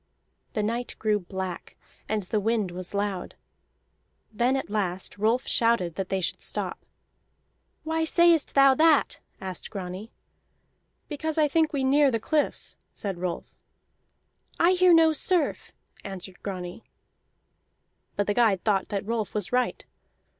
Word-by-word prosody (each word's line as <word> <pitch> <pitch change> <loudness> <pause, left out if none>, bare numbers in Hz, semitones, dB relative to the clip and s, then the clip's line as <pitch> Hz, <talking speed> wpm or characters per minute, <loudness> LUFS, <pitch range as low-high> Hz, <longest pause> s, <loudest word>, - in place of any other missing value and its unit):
The 210 - -1
night 235 +3 -2
grew 215 -1 +1
black, 190 -1 -6 0.3
and 215 -1 0
the 210 +4 -1
wind 215 -3 0
was 185 +2 -6
loud. 200 -3 -2 1.0
Then 245 +5 +2
at 265 - -4
last 195 -2 -2
Rolf 225 +4 +2
shouted 230 -7 +2
that 190 +2 -4
they 190 -1 0
should - - -2
stop. - - -4 1.0
"Why 320 +1 -1
sayest 335 -1 +4
thou 275 -1 +7
that?" 310 +1 +3 0.2
asked 185 -2 -6
Grani. 190 +2 -7 1.0
"Because 315 +1 -3
I 305 -1 +4
think 315 +1 +2
we 280 -3 -1
near 280 +2 +4
the 230 -3 0
cliffs," 300 +6 -1 0.2
said 195 -4 -5
Rolf. 180 -1 -4 1.1
"I 340 +2 +5
hear 365 -1 +5
no 325 -1 +6
surf," 340 0 0 0.3
answered 190 -1 -8
Grani. 185 0 -6 1.3
But 205 - 0
the 205 - 0
guide 215 -5 +3
thought 200 -3 +1
that 200 -2 -3
Rolf 220 -2 -3
was 210 -3 -2
right. 250 0 0
220 Hz, 140 wpm, -26 LUFS, 195-285 Hz, 1.3 s, thou